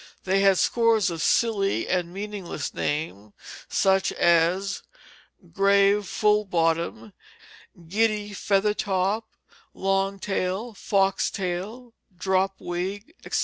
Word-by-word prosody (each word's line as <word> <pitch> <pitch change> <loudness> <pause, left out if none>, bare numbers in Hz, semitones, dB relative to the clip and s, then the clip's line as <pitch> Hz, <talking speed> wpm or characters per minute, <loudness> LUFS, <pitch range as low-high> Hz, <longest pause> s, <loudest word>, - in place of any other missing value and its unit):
They 195 +1 +1
had 195 -1 +4
scores 225 -5 +2
of 165 -2 -5
silly 205 -2 +1
and 180 -2 -1
meaningless 195 -5 -5
names, 105 -9 -3 0.4
such 190 0 +2
as 175 +3 +2 0.7
"grave 200 0 +3
full 210 0 +2
bottom," 165 - -1 0.7
"giddy 210 +2 0
feather 200 +1 +1
top," 205 +2 -1 0.5
"long 195 +1 0
tail," 195 +3 -3
"fox 195 -1 +1
tail," 200 +6 -5 0.2
"drop 190 +1 +1
wig," 195 - -5
etc. - - -1
195 Hz, 105 wpm, -25 LUFS, 180-210 Hz, 0.7 s, had